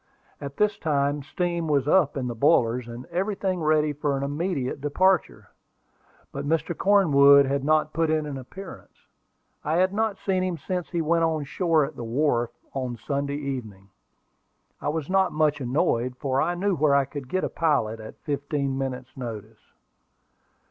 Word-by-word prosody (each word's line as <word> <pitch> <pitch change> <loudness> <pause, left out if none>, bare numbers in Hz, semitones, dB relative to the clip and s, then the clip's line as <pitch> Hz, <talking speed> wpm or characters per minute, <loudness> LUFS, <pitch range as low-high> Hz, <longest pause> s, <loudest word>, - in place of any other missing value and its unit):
At 140 0 -7
this 210 -1 +1
time 145 -2 0
steam 170 +3 -2
was 145 -2 +1
up 150 -4 +3
in 130 - -2
the 120 - -3
boilers, 120 -2 +2
and 120 +2 -8
everything 190 0 -1
ready 155 -1 +2
for 145 -1 -1
an 135 - -3
immediate 145 -2 -2
departure. 185 +6 +1 0.8
But 140 - -5
Mr. 165 +2 0
Cornwood 140 -9 +6
had 140 0 -1
not 155 +1 +2
put 165 0 +1
in 155 -1 +1
an 145 -2 -5
appearance. 190 +9 -11 0.7
I 155 +2 0
had 185 +2 +2
not 220 -1 0
seen 190 -2 -1
him 180 -2 -2
since 180 +1 -4
he 170 -2 -1
went 165 +1 +2
on 160 -2 -1
shore 160 +1 +1
at - - -9
the - - -6
wharf, 120 0 +1 0.2
on 130 -3 -3
Saturday 140 +4 -2
evening. 115 -9 -6 0.9
I - - -1
was 155 -1 -3
not 190 0 +2
much 150 -1 +1
annoyed, 125 -2 0
for 135 -1 0
I 175 +2 0
knew 195 +2 0
where 145 -2 +3
I 140 -1 +3
could 135 -1 -8
get 185 - -1
a - - +1
pilot 140 -9 0
at 110 - -10
fifteen 140 -2 -2
minutes' 130 -1 -5
notice. 110 -4 -7
145 Hz, 170 wpm, -25 LUFS, 135-170 Hz, 0.9 s, Cornwood